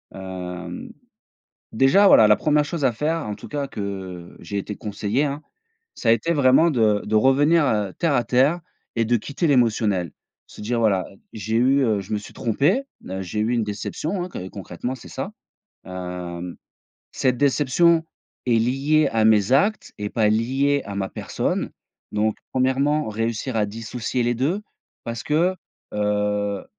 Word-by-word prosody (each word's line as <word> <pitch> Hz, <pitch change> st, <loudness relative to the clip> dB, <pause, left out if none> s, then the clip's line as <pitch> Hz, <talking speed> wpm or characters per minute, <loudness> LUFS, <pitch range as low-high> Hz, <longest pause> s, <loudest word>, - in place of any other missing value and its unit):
Hem, 90 Hz, -2 st, -7 dB, 0.8 s
déjà 135 Hz, -, +5 dB
voilà 110 Hz, -, +7 dB
la 105 Hz, -, +6 dB
1re 150 Hz, -1 st, +2 dB
chose 155 Hz, -1 st, -4 dB
à 125 Hz, -, +4 dB
faire 155 Hz, +4 st, -2 dB
en 105 Hz, -, -3 dB
tout -, -, -11 dB
cas, 145 Hz, -2 st, -3 dB
que 95 Hz, -5 st, -6 dB
j'ai 100 Hz, +4 st, -5 dB
été 105 Hz, +1 st, -5 dB
conseillé 105 Hz, +6 st, -1 dB
hein, 145 Hz, +1 st, -3 dB, 0.5 s
ça 115 Hz, -, -1 dB
a -, -, +8 dB
été 115 Hz, +9 st, +2 dB
vraiment 140 Hz, +3 st, +5 dB
de 110 Hz, -5 st, +2 dB
de 110 Hz, +1 st, -1 dB
revenir, 145 Hz, +7 st, +4 dB
heu, 105 Hz, -5 st, 0 dB
terre 165 Hz, -4 st, 0 dB
à 120 Hz, -, +2 dB
terre 130 Hz, +8 st, +2 dB, 0.4 s
et 115 Hz, -1 st, +1 dB
de 120 Hz, +1 st, +2 dB
quitter 140 Hz, -, -3 dB
l'émotionnel. 110 Hz, -, +2 dB, 0.4 s
Se -, -, -12 dB
dire: 115 Hz, +2 st, -1 dB
«Voilà, 100 Hz, -5 st, +2 dB, 0.3 s
j'ai 110 Hz, +2 st, -2 dB
eu, 135 Hz, +3 st, +4 dB
heu, 110 Hz, -4 st, +2 dB
je 95 Hz, -, -11 dB
me -, -, +1 dB
suis 105 Hz, -, -10 dB
trompé, 145 Hz, -, +1 dB, 0.2 s
heu, 95 Hz, +1 st, -4 dB
j'ai 95 Hz, +3 st, -4 dB
eu 110 Hz, +3 st, +1 dB
une 115 Hz, -2 st, +1 dB
déception 150 Hz, -, -3 dB
hein, 180 Hz, -, -6 dB
que 95 Hz, -, -6 dB
concrètement 100 Hz, +6 st, -5 dB
c'est 125 Hz, -, -13 dB
ça. 160 Hz, +10 st, -5 dB, 0.6 s
Hem, 90 Hz, -1 st, -6 dB, 0.5 s
cette 125 Hz, -1 st, 0 dB
déception 150 Hz, +4 st, +3 dB, 0.4 s
est 120 Hz, -, +2 dB
liée 135 Hz, +6 st, +2 dB
à 110 Hz, -1 st, +1 dB
mes 105 Hz, -1 st, +4 dB
actes 205 Hz, +11 st, +2 dB
et 105 Hz, 0 st, -3 dB
pas 110 Hz, -3 st, +2 dB
liée 135 Hz, +6 st, +1 dB
à 100 Hz, -, -6 dB
ma 95 Hz, -1 st, -2 dB
personne. -, -, -2 dB, 0.4 s
Donc 105 Hz, +1 st, 0 dB, 0.2 s
premièrement 135 Hz, +2 st, +1 dB
réussir 115 Hz, +3 st, -2 dB
à 105 Hz, -1 st, +2 dB
dissocier 115 Hz, +3 st, -3 dB
les 120 Hz, +1 st, +1 dB
2 165 Hz, -, 0 dB, 0.4 s
parce 115 Hz, -1 st, -4 dB
que, 170 Hz, +5 st, +1 dB, 0.4 s
heu, 105 Hz, -1 st, 0 dB
115 Hz, 170 wpm, -23 LUFS, 105-140 Hz, 0.8 s, a